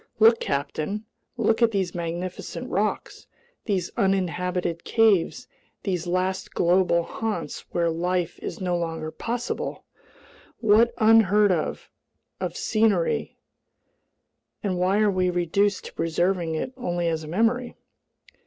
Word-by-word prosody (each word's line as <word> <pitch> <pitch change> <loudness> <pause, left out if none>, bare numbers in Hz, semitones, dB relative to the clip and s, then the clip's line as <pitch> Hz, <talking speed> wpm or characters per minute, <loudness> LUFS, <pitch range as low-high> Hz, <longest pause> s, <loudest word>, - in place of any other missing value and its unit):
Look, 225 +1 +6
captain! 155 +9 -2 0.3
Look 225 0 +2
at 235 - +6
these 195 -5 -1
magnificent 175 +1 -5
rocks, - - -2 0.4
these 190 -6 -1
uninhabited 180 -2 0
caves, 215 -7 +2 0.4
these 180 -3 -2
last 185 +1 -1
global 175 -1 +3
haunts 220 +4 -4
where 170 -1 +1
life 175 +1 -1
is - - -6
no 180 -2 0
longer 165 -2 -3
possible! 240 +6 -4 0.7
What 225 +1 +4
unheard 210 -2 +5
of 165 -4 -2 0.7
scenery, 215 -6 +1 1.3
and 185 -3 -1
why 190 +4 +2
are 210 -1 +4
we 185 -1 +1
reduced 180 +3 +1
to - - -9
preserving 170 0 0
it 255 +11 -3
only 175 -8 -1
as 160 -1 -1
a - - -8
memory?" 230 +8 0
185 Hz, 115 wpm, -25 LUFS, 170-210 Hz, 1.3 s, Look